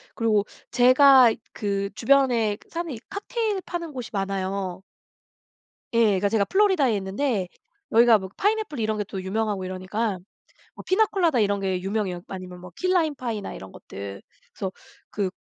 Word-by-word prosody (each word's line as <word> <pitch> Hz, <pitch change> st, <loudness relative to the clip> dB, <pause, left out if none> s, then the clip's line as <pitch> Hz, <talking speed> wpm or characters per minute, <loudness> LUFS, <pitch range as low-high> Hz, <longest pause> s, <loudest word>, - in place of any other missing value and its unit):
그리고 215 Hz, -3 st, +2 dB, 0.3 s
제가 255 Hz, -1 st, +7 dB, 0.2 s
그 200 Hz, -1 st, -2 dB
주변에 235 Hz, -5 st, +3 dB
사는 335 Hz, -2 st, -4 dB
이 220 Hz, -, -7 dB
칵테일 420 Hz, -1 st, -2 dB
파는 340 Hz, -4 st, -5 dB
곳이 250 Hz, -3 st, -6 dB
많아요. 195 Hz, -1 st, -3 dB, 1.1 s
예. 230 Hz, 0 st, +4 dB
그러니까 200 Hz, -1 st, +2 dB
제가 205 Hz, -2 st, +2 dB
플로리다에 370 Hz, -, +3 dB
있는데 195 Hz, 0 st, -1 dB, 0.4 s
여기가 230 Hz, 0 st, +6 dB
뭐 190 Hz, -1 st, -7 dB
파인애플 415 Hz, -, 0 dB
이런 215 Hz, -1 st, 0 dB
게 210 Hz, -, -1 dB
또 190 Hz, 0 st, -6 dB
유명하고 200 Hz, 0 st, -2 dB
이러니까 185 Hz, +2 st, -3 dB, 0.6 s
뭐 -, -, -10 dB
피나콜라다 375 Hz, -, +2 dB
이런 200 Hz, -1 st, +2 dB
게 185 Hz, -2 st, -1 dB
유명해요. 195 Hz, -3 st, -2 dB
아니면 185 Hz, -1 st, -8 dB
뭐 180 Hz, 0 st, -11 dB
키 365 Hz, -, -1 dB
라임 320 Hz, -5 st, +2 dB
파이나 230 Hz, -6 st, -4 dB
이런 95 Hz, 0 st, -10 dB
것들. 100 Hz, 0 st, -9 dB, 0.3 s
그래서 190 Hz, -1 st, -4 dB, 0.4 s
그 200 Hz, -3 st, -1 dB
215 Hz, 340 characters per minute, -25 LUFS, 190-275 Hz, 1.1 s, 제가